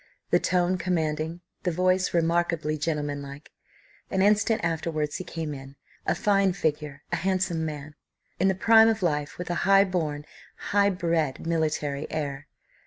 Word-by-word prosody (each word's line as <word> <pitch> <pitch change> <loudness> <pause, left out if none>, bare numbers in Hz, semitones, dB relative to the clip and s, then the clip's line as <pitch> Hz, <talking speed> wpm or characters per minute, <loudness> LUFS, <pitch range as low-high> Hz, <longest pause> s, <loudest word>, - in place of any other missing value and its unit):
The - - +5
tone 180 0 +1
commanding, 160 -2 -1 0.2
the - - 0
voice 185 +2 +1
remarkably 170 -2 +1
gentlemanlike. 145 -2 -4 0.6
An 190 0 +1
instant 210 +2 +3
afterwards 160 -2 -1
he - - -5
came 165 -3 -5
in. 135 0 -10 0.3
A - - +2
fine 195 -2 +2
figure, 150 -5 -2
a - - +1
handsome 185 -3 0
man; 150 -1 -6 0.5
in 190 - +3
the 190 - +2
prime 225 +3 +6
of 220 -3 +1
life; 150 -3 -1
with 180 0 -4
a 175 +2 -1
high 195 0 +7
born, 155 -6 -2 0.5
high 200 0 +4
bred 165 -7 -1
military 155 -3 -1
air. 145 -2 -4
165 Hz, 150 wpm, -26 LUFS, 150-185 Hz, 0.6 s, high